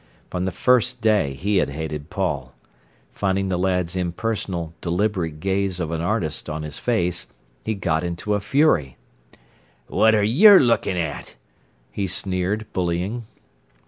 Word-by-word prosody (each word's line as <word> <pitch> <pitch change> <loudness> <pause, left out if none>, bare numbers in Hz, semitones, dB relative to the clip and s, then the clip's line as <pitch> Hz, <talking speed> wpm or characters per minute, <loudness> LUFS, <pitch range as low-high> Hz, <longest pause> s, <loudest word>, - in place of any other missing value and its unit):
From 90 0 -2
the 95 - -1
first 125 +5 +2
day 105 - +2
he 100 +8 0
had 90 - +2
hated 75 +1 -5
Paul. 75 -10 -3 0.6
Finding 95 -1 0
the 90 -1 0
lad's 90 -1 0
impersonal, 90 -2 -3
deliberate 90 -3 -1
gaze 95 0 -1
of 80 -2 -2
an 80 -1 -2
artist 85 -5 -2
on 75 0 -4
his 75 -1 -7
face, 90 -8 -1 0.4
he 110 - -2
got 85 -4 0
into 85 +4 -2
a 105 - +1
fury. 100 - +2 0.9
"What 110 0 +3
are 105 - +2
yer 190 - +8
lookin' 115 -7 +2
at?" 80 -6 -4 0.6
he 100 - -2
sneered, 95 +3 -1
bullying. 95 +6 -2
95 Hz, 145 wpm, -22 LUFS, 85-105 Hz, 0.9 s, yer